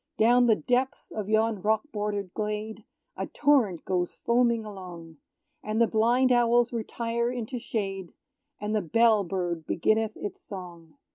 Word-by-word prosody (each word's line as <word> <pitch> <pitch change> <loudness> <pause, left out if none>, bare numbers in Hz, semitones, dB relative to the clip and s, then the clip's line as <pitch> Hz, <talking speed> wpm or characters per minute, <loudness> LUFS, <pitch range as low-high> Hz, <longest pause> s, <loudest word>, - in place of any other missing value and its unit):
Down 245 +2 +5
the 220 - +5
depths 255 +5 -1
of 210 -2 -5
yon 220 -2 +1
rock 215 +2 +1
border'd 205 -3 -3
glade, 215 0 -4 0.3
A - - -4
torrent 255 - +2
goes 180 -2 -1
foaming 235 -2 +2
along; 175 -5 -10 0.5
And 215 +1 -2
the 235 - +6
blind 240 +4 +2
owls 240 0 +3
retire 235 +1 -2
into 245 0 -4
shade, 195 -6 -4 0.5
And 210 +1 -2
the 215 - +2
bell 220 +4 +3
bird 175 -3 -3
beginneth 220 +5 +1
its 205 - -6
song. 170 -5 -10
215 Hz, 145 wpm, -27 LUFS, 195-235 Hz, 0.5 s, the